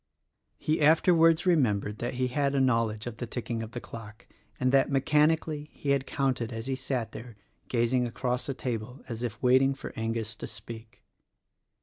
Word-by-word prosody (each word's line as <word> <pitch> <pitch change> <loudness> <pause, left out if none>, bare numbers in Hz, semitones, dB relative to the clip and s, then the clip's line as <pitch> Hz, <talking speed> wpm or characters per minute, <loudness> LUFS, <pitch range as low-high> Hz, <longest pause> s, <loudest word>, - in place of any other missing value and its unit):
He 155 +1 0
afterwards 165 +2 +5
remembered 110 - +2
that 120 - -3
he 125 0 0
had 140 +1 0
a - - +3
knowledge 115 -4 +1
of 120 -2 -6
the 120 - -4
ticking 120 -1 -3
of 110 0 -7
the 120 - -3
clock, 110 -1 -10 0.3
and, 130 0 +2
that, 135 0 +4
mechanically 150 +2 +2
he 140 - -2
had 135 -1 +1
counted 130 -4 -1
as 115 0 -5
he 135 - -1
sat 130 -3 -3
there 115 0 -9 0.3
gazing 120 +1 +1
across 125 +2 -2
the 135 - -2
table 125 +1 -4
as 115 -2 -5
if 120 -2 -4
waiting 130 +2 +4
for - - -8
Angus 115 -1 -2
to - - -6
speak. 110 -1 -9
125 Hz, 180 wpm, -28 LUFS, 115-140 Hz, 0.3 s, afterwards